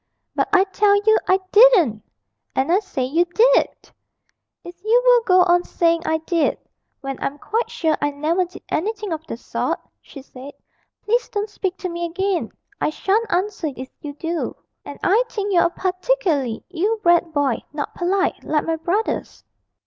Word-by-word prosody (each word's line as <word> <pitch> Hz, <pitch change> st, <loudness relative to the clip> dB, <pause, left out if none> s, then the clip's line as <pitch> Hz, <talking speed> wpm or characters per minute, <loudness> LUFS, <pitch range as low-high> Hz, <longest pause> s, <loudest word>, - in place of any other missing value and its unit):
'But -, -, 0 dB
I 385 Hz, -1 st, +5 dB
tell 405 Hz, +1 st, +2 dB
you 435 Hz, 0 st, +6 dB
I 375 Hz, +1 st, +4 dB
didn't! 390 Hz, -, +6 dB, 0.5 s
'And 265 Hz, +5 st, +1 dB
I 370 Hz, -, +4 dB
say 380 Hz, -10 st, -4 dB
you 320 Hz, +7 st, +2 dB
did!' 465 Hz, +8 st, +2 dB, 0.7 s
'If 350 Hz, +1 st, -12 dB
you 450 Hz, +3 st, +4 dB
will -, -, +6 dB
go 365 Hz, -1 st, +6 dB
on 350 Hz, 0 st, +3 dB
saying 335 Hz, -1 st, +1 dB
I 320 Hz, -, +2 dB
did, 325 Hz, 0 st, 0 dB, 0.4 s
when 270 Hz, -1 st, -6 dB
I'm 280 Hz, -, -3 dB
quite 450 Hz, +10 st, -2 dB
sure 320 Hz, -2 st, 0 dB
I 290 Hz, -, +1 dB
never 310 Hz, +6 st, 0 dB
did 355 Hz, -, -13 dB
anything 420 Hz, +1 st, -2 dB
of 320 Hz, 0 st, -5 dB
the -, -, -5 dB
sort,' -, -, -3 dB, 0.2 s
she 275 Hz, -, -12 dB
said, 270 Hz, +1 st, -11 dB, 0.5 s
'please 475 Hz, +3 st, 0 dB
don't 415 Hz, 0 st, -3 dB
speak 380 Hz, -3 st, -3 dB
to 365 Hz, -, -4 dB
me 345 Hz, 0 st, -3 dB
again; 380 Hz, +2 st, -2 dB, 0.3 s
I -, -, +2 dB
shan't 410 Hz, +7 st, 0 dB
answer 365 Hz, -3 st, -1 dB
if 260 Hz, +1 st, -7 dB
you 290 Hz, -1 st, -7 dB
do. 330 Hz, +3 st, -3 dB, 0.3 s
And -, -, -9 dB
I 415 Hz, +6 st, +4 dB
think 410 Hz, -3 st, -3 dB
you're 345 Hz, -, +4 dB
a -, -, +3 dB
particularly 365 Hz, -, -1 dB
ill 400 Hz, +6 st, 0 dB
bred 345 Hz, -4 st, +3 dB
boy 285 Hz, -5 st, 0 dB
not 290 Hz, -1 st, -5 dB
polite, 375 Hz, +2 st, -1 dB
like 305 Hz, -1 st, 0 dB
my 325 Hz, 0 st, -1 dB
brothers.' 365 Hz, +7 st, -2 dB
355 Hz, 175 wpm, -21 LUFS, 315-410 Hz, 0.7 s, you